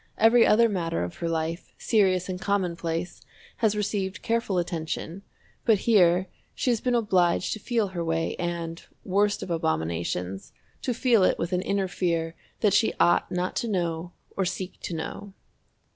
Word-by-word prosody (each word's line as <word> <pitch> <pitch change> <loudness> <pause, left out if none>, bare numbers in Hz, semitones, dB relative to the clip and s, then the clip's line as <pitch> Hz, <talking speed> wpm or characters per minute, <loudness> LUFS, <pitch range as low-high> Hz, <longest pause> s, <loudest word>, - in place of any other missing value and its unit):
Every 230 +1 +6
other 230 +2 +5
matter 170 - -1
of 85 - -6
her 170 - -2
life, 165 +1 -3
serious 185 -5 +2
and 185 -1 -4
commonplace, 175 -4 -2 0.4
has 220 -3 +2
received 200 -2 -2
careful 230 -4 0
attention, 170 +1 -3 0.4
but 220 -2 +4
here 185 -5 +5 0.3
she 250 - +1
has 230 - 0
been 250 -1 +1
obliged 185 -6 +2
to 215 - -6
feel 225 -2 0
her 175 -2 -3
way 165 0 -1
and, 170 -1 -4 0.2
worst 205 +2 +1
of 185 - -6
abominations, 85 - -2 0.3
to 250 - -1
feel 235 -5 +4
it - - +3
with 170 +2 -3
an 180 - +1
inner 195 0 0
fear 165 -3 -1 0.3
that 210 -3 +3
she 210 +2 +3
ought 175 - +3
not 180 +1 -2
to 235 - -1
know 175 -4 -2 0.2
or 195 - +1
seek 185 0 -4
to 170 - -5
know. 190 +5 -6
185 Hz, 165 wpm, -26 LUFS, 170-205 Hz, 0.4 s, Every